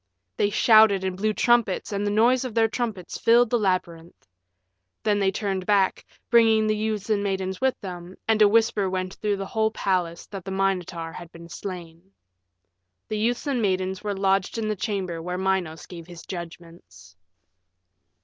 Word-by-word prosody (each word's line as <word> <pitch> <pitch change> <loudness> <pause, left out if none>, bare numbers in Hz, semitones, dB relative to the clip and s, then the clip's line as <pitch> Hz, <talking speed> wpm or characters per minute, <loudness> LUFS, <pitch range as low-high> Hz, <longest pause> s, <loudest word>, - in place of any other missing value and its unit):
They 205 - +1
shouted 215 -3 +5
and 190 -1 -2
blew 215 +3 0
trumpets 235 -3 +1
and 200 0 -1
the - - +1
noise 235 +5 +3
of 250 -4 -6
their 225 -1 +4
trumpets 220 -5 -4
filled 235 0 +4
the 240 - +2
labyrinth. 180 -4 -3 0.8
Then 205 -1 +2
they 195 -1 +2
turned 195 -2 -3
back, 200 -2 +2 0.3
bringing 225 -2 +5
the 215 0 +1
youths 215 -1 -2
and 205 -1 +2
maidens 190 0 -3
with 265 -1 +1
them, 180 -2 -8
and 220 -1 +2
a 210 - +8
whisper 220 -2 +2
went 185 0 -3
through 210 -2 -2
the 195 - -4
whole 220 +2 0
palace 180 -5 -2
that 195 -3 -8
the 195 - -7
Minotaur 185 -4 -2
had 175 -1 -10
been 170 0 -12
slain. 180 0 -8 1.0
The 215 - -2
youths 240 +5 0
and 270 -5 0
maidens 190 -1 -1
were 205 -2 -3
lodged 195 +1 +1
in 220 -1 -2
the 215 - -1
chamber 185 -4 -3
where 180 +2 -4
Minos 185 -4 -1
gave 170 -2 -10
his 175 -2 -11
judgments. 165 - -10
195 Hz, 175 wpm, -24 LUFS, 180-215 Hz, 1.0 s, a